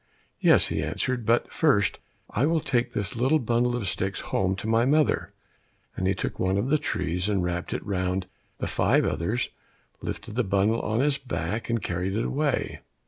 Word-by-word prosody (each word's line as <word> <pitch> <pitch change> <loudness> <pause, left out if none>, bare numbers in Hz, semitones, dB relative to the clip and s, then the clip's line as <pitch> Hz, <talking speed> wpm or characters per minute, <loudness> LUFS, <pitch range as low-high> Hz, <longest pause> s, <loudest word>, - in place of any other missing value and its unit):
"Yes," - - +5
he - - -1
answered, 125 -3 -2
"but, 115 +1 +2
first, 105 - +2 0.3
I 130 +7 +2
will 165 0 +2
take 130 -5 0
this 100 +1 -2
little 130 +6 +3
bundle 120 -1 +1
of 115 -5 -2
sticks 95 +1 -1
home 95 0 0
to 100 - -5
my 115 +1 +3
mother," 150 +4 +2 0.6
and 95 - -1
he 95 - +2
took - - -4
one 95 +1 +1
of 120 +6 0
the 155 +1 +3
trees, 90 -4 -1
and 100 -3 +1
wrapped 90 0 -2
it - - -3
round 95 -1 -1 0.3
the - - -3
five - - +2
others, 105 - -1 0.5
lifted 105 +1 -5
the 125 +3 +1
bundle 100 +3 +2
on 110 +3 0
his 145 0 +1
back, 110 - -3
and 115 -3 0
carried 90 +2 -2
it 115 - 0
away. 145 0 -1
110 Hz, 190 wpm, -26 LUFS, 95-125 Hz, 0.6 s, Yes